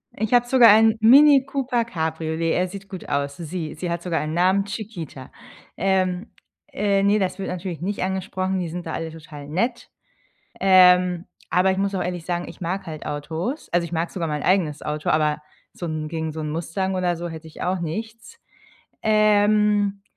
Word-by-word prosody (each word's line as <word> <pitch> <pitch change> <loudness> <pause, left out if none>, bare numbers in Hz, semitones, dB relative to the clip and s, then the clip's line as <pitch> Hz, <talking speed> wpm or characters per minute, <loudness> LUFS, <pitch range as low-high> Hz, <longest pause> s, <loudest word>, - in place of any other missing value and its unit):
Ich 220 +2 -2
habe 245 0 +4
sogar 245 -2 +7
einen 220 +1 +6
Mini 275 +3 +7
Cooper 260 -4 -1
Cabriolet. 160 -3 -2
Er 185 +1 +1
sieht 195 +1 -10
gut 190 -3 -8
aus. 140 0 -2
Sie 165 -1 -5
sie 175 +2 -4
hat 170 0 -2
sogar 175 -2 -1
einen 155 +1 -3
Namen, 185 +3 +2
Chiquita. 190 - -7 0.5
Ähm. 185 +1 0 0.4
Äh, 200 -1 +1
ne, 200 +2 +3
das 190 -1 -2
wird 195 - -3
natürlich 180 -2 -5
nicht 195 +1 -2
angesprochen. 190 0 -2
Die 175 - -2
sind 175 +2 -6
da 160 - -5
alle 165 0 -4
total 150 -3 -11
nett. 230 - -2 0.7
Ähm, 180 -2 +5 0.2
aber 185 +1 +3
ich 190 - -2
muss 195 0 -1
auch 185 - -1
ehrlich 175 -2 -4
sagen, 175 -1 -2
ich - - -11
mag 185 +3 -3
halt 155 -3 -7
Autos. 160 - -4
Also, 175 0 +1
ich 170 - -10
mag 165 +1 -1
sogar 170 -3 -3
mein 150 -1 -3
eigenes 175 -6 +1
Auto, 150 0 -3
aber 150 -1 +1 0.3
so 175 - -6
'n 155 -2 -4
gegen 160 -1 -3
so 160 - -5
'n 155 - -3
Mustang 175 +4 -2
oder 180 -1 0
so 170 +1 -5
hätt 160 0 -9
ich 160 - -11
auch 180 0 0
nichts. 220 +8 -6 0.6
Ähm. 210 -1 +3
180 Hz, 190 wpm, -23 LUFS, 160-200 Hz, 0.7 s, sogar